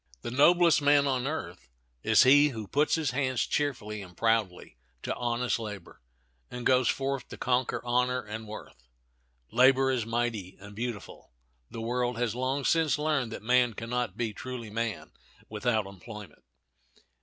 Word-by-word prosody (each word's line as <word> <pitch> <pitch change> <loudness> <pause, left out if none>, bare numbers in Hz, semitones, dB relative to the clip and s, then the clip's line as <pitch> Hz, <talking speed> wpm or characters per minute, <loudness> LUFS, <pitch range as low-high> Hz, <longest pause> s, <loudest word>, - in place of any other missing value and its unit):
The - - -4
noblest 170 +5 +5
man 145 0 +4
on 130 -2 0
earth 90 - -6 0.3
is - - +5
he 145 +3 +6
who 110 -6 -7
puts 145 +8 +2
his 155 -5 -1
hands 130 -2 0
cheerfully 105 -8 -2
and 90 -3 -13
proudly 110 - -1 0.2
to - - -2
honest 120 0 -1
labor, 105 - -8 0.5
and 125 -1 -7
goes 130 -2 +4
forth 135 -1 -2
to - - -9
conquer 125 0 -1
honor 125 +1 +1
and 110 0 -7
worth. 65 - -11 0.6
Labor 130 +2 +4
is 125 -3 0
mighty 115 -5 -2
and 100 +1 -12
beautiful. 115 - -6 0.4
The 115 - -7
world 120 +1 -1
has 120 -3 -1
long 130 +3 -2
since 160 -3 +2
learned 150 -6 0
that 110 - -7
man 125 -1 +3
can 115 +2 -7
not 125 0 -2
be 115 -3 -2
truly 120 -1 -7
man 115 -2 -3 0.4
without 110 0 0
employment. 100 +2 -11
120 Hz, 155 wpm, -28 LUFS, 110-130 Hz, 0.6 s, he